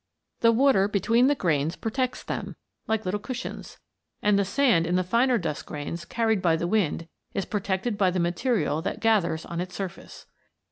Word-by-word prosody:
The 230 - +5
water 230 -5 +4
between 230 +5 +3
the 290 - +3
grains 160 - 0
protects 255 +3 -2
them; - - -5 0.3
like 220 -2 0
little 190 +3 -1
cushions. 250 +3 -6 0.5
And 205 -1 +4
the - - +3
sand 200 -6 +2
in 175 - +1
the 185 - +2
finer 240 +6 +2
dust 165 -7 -4
grains 155 +3 -5
carried 225 -4 0
by 170 -3 +3
the 165 - -2
wind 175 -4 0 0.3
is 195 -3 -1
protected 200 +2 -2
by 190 -2 +4
the 180 0 -1
material 175 - 0
that - - -3
gathers 175 -8 +1
on 170 0 -4
its 180 0 -6
surface. 190 -3 -7
195 Hz, 180 wpm, -26 LUFS, 170-230 Hz, 0.5 s, The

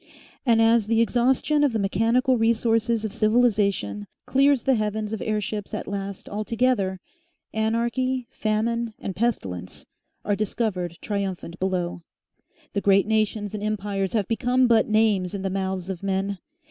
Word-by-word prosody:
And 225 -1 +5
as 225 -2 +4
the 225 0 +2
exhaustion 260 +5 +2
of 280 -5 +2
the - - +1
mechanical 225 +6 +2
resources 230 0 +1
of 215 - -4
civilisation 205 - +1 0.2
clears 275 -1 +3
the 270 - +3
heavens 215 -1 -1
of 220 - -4
airships 210 -1 -3
at - - -4
last 200 -1 -5
altogether, 215 -3 0 0.5
Anarchy, 235 +3 0
Famine 225 +1 -1
and 190 - -5
Pestilence 95 - -3 0.4
are 205 - +1
discovered 190 -5 -2
triumphant 190 -4 -4
below. 180 -2 -2 0.7
The 200 - 0
great 200 -1 +4
nations 215 -1 0
and 210 - -4
empires 205 -2 -2
have 210 -4 0
become 250 +2 +2
but 230 -2 +4
names 210 -4 +2
in 195 - -4
the 195 - -1
mouths 190 -1 -2
of 190 -3 -5
men. 195 0 -1
215 Hz, 145 wpm, -24 LUFS, 195-230 Hz, 0.7 s, And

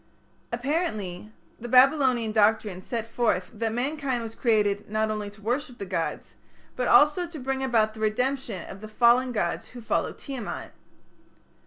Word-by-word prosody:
_ - - -35 0.5
Apparently 235 - -2 0.3
the 240 - -6
Babylonian 255 -2 +4
doctrine 210 -3 +2
set 230 +3 -4
forth 210 -6 0
that 225 0 -2
mankind 260 0 -1
was 225 -1 -6
created 210 -4 +1
not 215 0 0
only 210 -1 -3
to 205 0 -16
worship 245 +2 -2
the 200 - -5
gods, 165 -3 -3 0.4
but 250 - -1
also 300 +4 +5
to 335 -2 -9
bring 265 0 -2
about 225 -4 +2
the 220 - -12
redemption 235 -1 -1
of 195 - -10
the 215 - -7
fallen 240 +3 +4
gods 175 -7 -2
who 250 - -11
followed 225 - -1
Tiamat. 265 -5 -6
230 Hz, 160 wpm, -26 LUFS, 215-260 Hz, 0.5 s, also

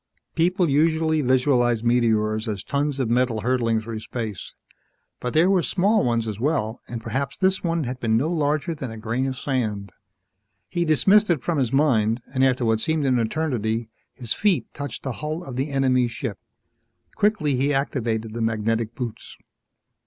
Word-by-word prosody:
_ - - -53
People 175 +2 +2
usually 160 +2 +2
visualized 125 -3 +2
meteors 110 -2 +1
as 105 -3 -3
tons 140 0 -1
of 130 - 0
metal 120 -1 +1
hurtling 120 -2 +1
through 110 0 -6
space. 110 -2 -6 0.6
But 125 +2 -4
there 165 +3 +5
were 190 -2 +3
small 200 +5 +2
ones 115 -2 0
as 105 -1 -4
well, 120 -5 -1
and 120 - -5
perhaps 130 +4 -3
this 190 0 +1
one 165 -2 0
had 125 0 -4
been 110 -2 +2
no 135 +7 +1
larger 155 +1 0
than 140 -5 -6
a 115 - -8
grain 115 +4 -2
of 130 -1 -4
sand. 110 -8 -2 0.8
He 175 -1 0
dismissed 195 +7 +4
it 155 -8 +1
from 165 -4 0
his 125 -4 0
mind, 120 -6 +2
and 130 0 +2
after 130 -2 +2
what 110 -1 +2
seemed 160 +4 0
an 130 -2 +2
eternity, 115 -3 -1 0.3
his 120 -3 -2
feet 205 -5 0
touched 145 -3 -6
the 130 - -2
hull 155 +3 -3
of 130 -7 -7
the 135 +4 -1
enemy 130 -3 +2
ship. 115 -3 -5 0.7
Quickly 205 -10 +1
he 135 +3 +1
activated 115 -6 -1
the 115 - -4
magnetic 115 +1 -1
boots. 120 -3 -6
130 Hz, 175 wpm, -23 LUFS, 115-155 Hz, 0.8 s, there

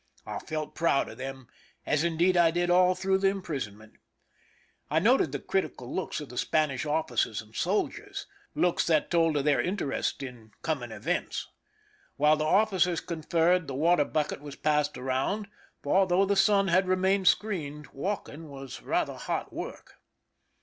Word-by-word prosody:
I - - -4
felt 155 -1 -5
proud 160 -4 +1
of - - -11
them, 135 -1 -6 0.4
as 150 +1 +1
indeed 170 +2 +2
I 170 -1 +5
did 175 +1 0
all 180 +1 +5
through 190 +1 +1
the 195 - +3
imprisonment. 135 - -4 0.9
I 155 - +1
noted 205 - +4
the 145 - -2
critical 130 -6 -3
looks 190 - -2
of 150 - -8
the 125 - -4
Spanish 150 -2 0
officers 145 -8 0
and 110 0 -11
sol 195 +4 +1
diers—looks 400 - -3
that 155 -2 +2
told 165 -3 +3
of 140 - -1
their 150 -1 +3
interest 180 -7 -2
in 115 -5 -10
coming 150 -7 -2
events. 105 -1 -2 0.7
While 150 +2 +4
the 155 - -1
officers 185 -1 +3
conferred, 170 +1 +1
the 135 - -4
water 160 +1 +3
bucket 150 -1 -2
was 145 -1 -8
passed 150 -1 +1
around; 135 +11 -1 0.4
for 190 +6 +3
though 185 +2 +3
the 200 +1 +1
sun 195 0 +4
had 185 +2 +3
remained 190 +1 +2
screened, 150 -10 0
walking 165 -1 -4
was 135 -2 -8
rather - - 0
hot - - -3
work. - - -8
160 Hz, 160 wpm, -28 LUFS, 140-185 Hz, 0.9 s, I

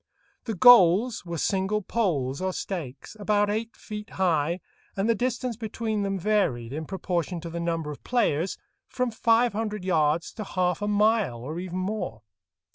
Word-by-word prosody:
The 225 - -3
goals 210 0 +6
were 170 0 -3
single 195 +5 0
poles 150 - -1
or 185 0 -1
stakes, 155 - -6
about 205 0 +2
eight 225 +2 -3
feet 210 0 -7
high, 170 -2 +1 0.4
and 195 +2 +1
the 230 - +4
distance 245 +1 -2
between 220 -1 -3
them 195 -1 -1
varied, 170 - 0
in 155 +2 -4
proportion 180 -1 -2
to 170 0 -7
the 170 - -4
number 165 -3 -2
of 145 - -10
players, 190 -8 0 0.3
from 250 -1 -1
five 230 +1 +3
hundred 210 -3 -3
yards 160 -2 +1
to 215 - -5
half 180 -1 -1
a 205 - -1
mile, 210 - +2
or 155 +7 -5
even 180 0 -5
more. 185 - -3
190 Hz, 165 wpm, -26 LUFS, 170-215 Hz, 0.4 s, goals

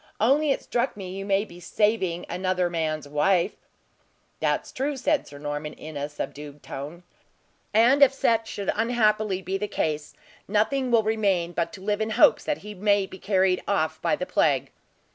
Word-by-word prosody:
Only 280 +7 +3
it 275 - 0
struck 235 -3 -1
me 185 -3 -6
you 195 0 -5
may 200 +1 +2
be 175 -4 -13
saving 190 -3 0
another 180 0 -1
man's 155 -3 -2
wife." 170 +5 +2 0.9
"That's - - -1
true!" 275 +2 -2
said 290 +3 0
Sir 145 - -11
Norman, 145 +1 -4
in 155 0 -10
a 145 +1 -3
subdued 145 0 -7
tone, 150 +6 -7 0.7
"and 240 +6 +4
if 275 -2 +8
such 230 -4 +1
should 200 -2 -2
unhappily 215 -4 +1
be 190 +1 -2
the 210 - -2
case, 155 -6 -2 0.3
nothing 220 +6 +1
will 230 -2 +4
remain 200 -6 +1
but 170 -1 -2
to 195 - -10
live 205 +2 -1
in 220 - 0
hopes 220 - +5
that 300 - 0
he 210 - -6
may 200 0 +2
be 190 0 -11
carried 190 -2 +2
off 160 -5 0
by 200 - +2
the 180 - -4
plague." 145 -7 +1
195 Hz, 180 wpm, -25 LUFS, 170-220 Hz, 0.9 s, if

